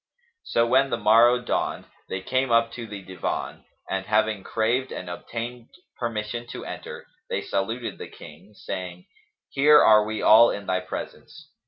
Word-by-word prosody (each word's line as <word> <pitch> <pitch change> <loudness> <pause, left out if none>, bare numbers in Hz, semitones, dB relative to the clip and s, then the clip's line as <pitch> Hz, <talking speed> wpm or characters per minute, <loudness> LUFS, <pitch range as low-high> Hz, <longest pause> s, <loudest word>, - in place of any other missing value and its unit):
So 115 - +1
when 130 +3 +3
the 120 - -1
morrow 115 +3 +5
dawned, 120 - -2 0.2
they 95 - -3
came 130 +6 0
up 115 0 +3
to 115 -2 -7
the 100 -2 -8
Divan 90 -2 -5 0.2
and, 95 0 -3
having 105 -1 +1
craved 120 +4 -1
and 90 - -6
obtained 115 +6 -6 0.3
permission 120 0 -4
to - - -7
enter, - - -8 0.2
they - - -2
saluted 115 +5 -3
the - - -7
King, 90 +8 -14
saying, 90 -2 -7 0.4
"Here 150 +2 +6
are 105 -1 +6
we 110 0 -4
all 115 +2 +8
in 100 - -4
thy 95 0 0
presence." 90 - -9
110 Hz, 160 wpm, -25 LUFS, 95-120 Hz, 0.4 s, all